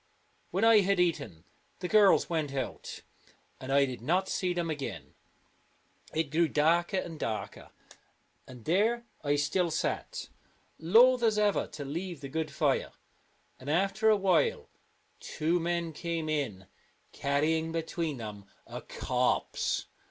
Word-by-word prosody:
When 190 +5 -1
I 225 -1 +7
had 200 -1 +2
eaten, 165 - -1 0.3
the 180 - -4
girls 210 -1 +5
went 155 -5 -2
out, 135 - -5 0.6
and 130 +1 -6
I 140 0 +5
did 130 -3 -6
not 180 +9 +1
see 180 -1 -1
them 175 -1 -1
again. 150 -4 -5 1.0
It 160 -3 -1
grew 165 +2 +3
darker 170 +6 +2
and 165 -4 -4
darker, 110 -1 -4 0.8
and 125 -3 -12
there 225 +8 +2 0.2
I 145 0 +2
still 170 +5 +1
sat, 160 - -3 0.5
loath 235 +9 +5
as 220 -2 +2
ever 210 -1 +2
to 145 - -8
leave 170 +3 -5
the 140 - -7
good 160 +2 -2
fire, - - 0 0.7
and 130 - -8
after 195 +7 +2
a 215 - +5
while 185 -6 +1 0.5
two 165 +3 -1
men 170 -1 -2
came 165 0 -3
in, 130 -11 -2 0.5
carrying 160 +3 0
between 165 -2 -3
them 105 -3 -8 0.2
a - - -7
corpse. - - -1
165 Hz, 135 wpm, -30 LUFS, 145-185 Hz, 1.0 s, I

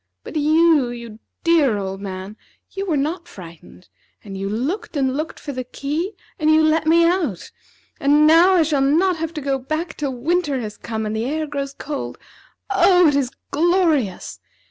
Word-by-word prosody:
But - - -10
you, 310 -2 +3
you 235 -2 -9 0.2
dear 310 -10 +3
old 195 -1 -5
man, 190 +1 -7 0.4
you 390 0 -5
were 320 -5 +1
not 335 +5 -2
frightened, 180 - -13 0.4
and 195 -2 -8
you 195 +1 -3
looked 285 - -3
and 265 -2 0
looked 310 +3 -4
for 290 - -6
the 255 -2 -4
key, 300 - -4 0.2
and 310 -1 +2
you 315 0 +5
let 315 0 +2
me 335 +1 +5
out, 335 - -1 0.5
and 295 0 +4
now 335 +4 +6
I 340 - +5
shall 295 -3 0
not 330 +6 +2
have 325 0 -3
to 305 - -4
go 270 -1 -1
back 310 +5 -4
till 280 -3 -3
winter 295 +1 0
has 215 -3 -6
come, 220 -1 -5
and 215 +1 -3
the 220 +1 -2
air 310 +4 -2
grows 280 -2 -4
cold. 290 -1 -5 0.5
Oh, 360 -4 +5
it 290 - 0
is 275 -3 +1 0.2
glorious! 315 - +1
295 Hz, 185 wpm, -21 LUFS, 245-330 Hz, 0.5 s, now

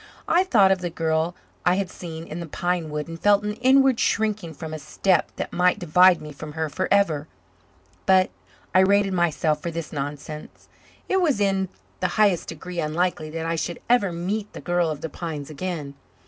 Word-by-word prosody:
I 355 - +4
thought 210 - +5
of 190 - +2
the 175 - -2
girl 160 +1 0 0.3
I 180 0 +4
had 195 -1 -2
seen 165 -2 -7
in 160 +1 -6
the 170 - -5
pine 175 +1 -2
wood 150 +1 -4
and 165 0 -8
felt 205 +2 +4
an 210 0 -2
inward 265 0 +4
shrinking 215 -10 0
from 160 +1 -7
a 155 - -4
step 180 +5 +1
that - - -5
might 180 +2 +3
divide 180 -1 +5
me 150 - -8
from 150 +1 -9
her 160 0 -2
forever. 185 -3 +1 0.8
But 185 -1 +5 0.4
I 185 - +6
rated 200 +1 +4
myself 160 -3 +1
for 170 - -3
this 165 -1 -5
nonsense. 145 +1 -6 0.4
It 380 0 +2
was 295 - +2
in 195 -2 +1 0.3
the - - +1
highest 205 -5 +3
degree 175 +2 -6
unlikely 155 0 -1
that 165 +1 -4
I 165 0 0
should 170 +1 -3
ever 220 -7 +4
meet 195 +5 -3
the - - -7
girl 175 -1 +1
of 150 -2 -4
the 160 - -4
pines 155 -2 -6
again. 155 -3 -4
175 Hz, 190 wpm, -24 LUFS, 160-195 Hz, 0.8 s, I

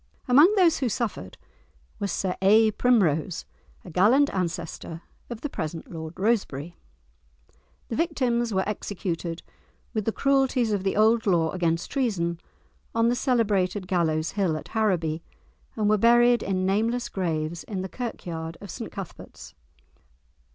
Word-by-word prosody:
Among 290 +9 +7
those 350 -5 +4
who 260 -3 0
suffered 210 - -4 0.6
was 200 - -2
Sir 185 -2 -1
A. 215 +3 +5
Primrose, 190 -8 +1 0.4
a 180 - -9
gallant 230 - +4
ancestor 170 -2 -4 0.3
of 235 -2 -7
the 295 - -2
present 160 - -5
Lord 160 0 -7
Rosebery. 175 - -1 1.1
The 230 - -2
victims 250 -8 0
were 190 -1 0
executed, 175 -5 -4 0.5
with 215 -3 -2
the 225 - +1
cruelties 265 -3 +2
of 200 -2 -1
the 195 - 0
old 220 +1 +3
law 165 -4 +2
against 170 -2 -1
treason, 180 - -1 0.6
on 230 0 +3
the 245 - +1
celebrated 205 -7 +1
Gallows 165 -4 0
Hill, 185 -6 0
at - - -9
Harraby, 175 -8 0 0.5
and 215 -2 0
were 215 0 +3
buried 240 +2 +5
in 185 -1 -1
nameless 225 +5 0
graves 165 -3 -2
in 190 -3 -4
the - - -3
Kirkyard 170 -8 -6
of 200 -3 -9
St 230 - -7
Cuthbert's. 180 - -9
200 Hz, 140 wpm, -26 LUFS, 170-235 Hz, 1.1 s, Among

